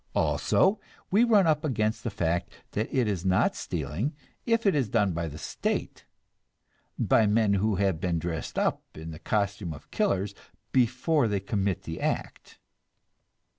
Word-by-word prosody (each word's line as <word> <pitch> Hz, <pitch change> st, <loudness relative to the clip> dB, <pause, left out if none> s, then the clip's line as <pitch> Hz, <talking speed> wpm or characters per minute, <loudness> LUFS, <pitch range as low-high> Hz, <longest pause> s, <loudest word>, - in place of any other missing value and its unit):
Also, 195 Hz, +3 st, +2 dB, 0.3 s
we 210 Hz, +5 st, +5 dB
run 215 Hz, -5 st, +5 dB
up 155 Hz, -1 st, +2 dB
against 110 Hz, -7 st, 0 dB
the 120 Hz, -, -1 dB
fact 85 Hz, -3 st, -1 dB, 0.2 s
that 110 Hz, +2 st, -2 dB
it 125 Hz, -4 st, +2 dB
is 95 Hz, -5 st, -1 dB
not 95 Hz, -1 st, +2 dB
stealing, 85 Hz, -, -3 dB, 0.3 s
if 230 Hz, -1 st, +2 dB
it 195 Hz, -, +5 dB
is 135 Hz, -7 st, +1 dB
done 105 Hz, -5 st, +2 dB
by 85 Hz, 0 st, -2 dB
the 75 Hz, -1 st, -8 dB
State, -, -, -3 dB, 0.9 s
by 110 Hz, -, +3 dB
men 105 Hz, -1 st, +3 dB
who 100 Hz, +1 st, +1 dB
have 95 Hz, -4 st, +1 dB
been 90 Hz, -3 st, 0 dB
dressed 80 Hz, -1 st, -4 dB
up -, -, +1 dB, 0.2 s
in 80 Hz, +1 st, -7 dB
the 80 Hz, -, -9 dB
costume 100 Hz, -5 st, -1 dB
of -, -, -16 dB
killers 100 Hz, +1 st, 0 dB, 0.4 s
before 130 Hz, +3 st, +2 dB
they 100 Hz, -2 st, 0 dB
commit 100 Hz, -1 st, -1 dB
the 80 Hz, -, -6 dB
act. -, -, -3 dB
105 Hz, 160 wpm, -28 LUFS, 90-125 Hz, 0.9 s, we